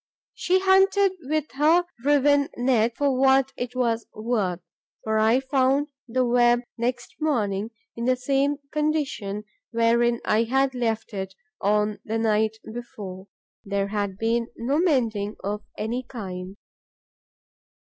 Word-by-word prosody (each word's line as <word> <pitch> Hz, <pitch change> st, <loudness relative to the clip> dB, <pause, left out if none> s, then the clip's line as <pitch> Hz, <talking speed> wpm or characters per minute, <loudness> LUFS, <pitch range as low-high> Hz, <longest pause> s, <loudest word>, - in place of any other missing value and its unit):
She 370 Hz, +1 st, +1 dB
hunted 385 Hz, +1 st, +4 dB
with 305 Hz, -1 st, -2 dB
her 310 Hz, +6 st, +3 dB, 0.2 s
riven 285 Hz, 0 st, +3 dB
net, 240 Hz, -2 st, +2 dB
for 280 Hz, -2 st, +2 dB
what 270 Hz, 0 st, +3 dB
it 245 Hz, 0 st, -5 dB
was 235 Hz, -2 st, 0 dB
worth; 215 Hz, -6 st, -1 dB, 0.4 s
for 220 Hz, 0 st, +1 dB
I 220 Hz, +4 st, +4 dB
found 270 Hz, +2 st, +1 dB, 0.2 s
the 250 Hz, +2 st, +1 dB
web 240 Hz, 0 st, +4 dB
next 240 Hz, +1 st, -3 dB
morning 215 Hz, -9 st, 0 dB, 0.3 s
in 235 Hz, -, -3 dB
the 255 Hz, 0 st, +3 dB
same 275 Hz, +3 st, +1 dB, 0.2 s
condition 290 Hz, -10 st, -1 dB, 0.3 s
wherein 235 Hz, 0 st, +2 dB
I 220 Hz, +2 st, +2 dB
had 265 Hz, +3 st, +1 dB
left 225 Hz, -3 st, -2 dB
it 190 Hz, -1 st, -5 dB, 0.3 s
on 210 Hz, +1 st, +1 dB
the 220 Hz, +1 st, -2 dB
night 220 Hz, 0 st, +1 dB, 0.2 s
before. 200 Hz, -5 st, -8 dB, 0.4 s
There 200 Hz, 0 st, -1 dB
had 200 Hz, -2 st, -2 dB
been 230 Hz, +2 st, 0 dB
no 270 Hz, +6 st, 0 dB
mending 230 Hz, -, +1 dB
of 205 Hz, +2 st, -2 dB, 0.2 s
any 235 Hz, +4 st, -2 dB
kind. 190 Hz, -6 st, -7 dB
240 Hz, 130 wpm, -25 LUFS, 215-270 Hz, 0.4 s, hunted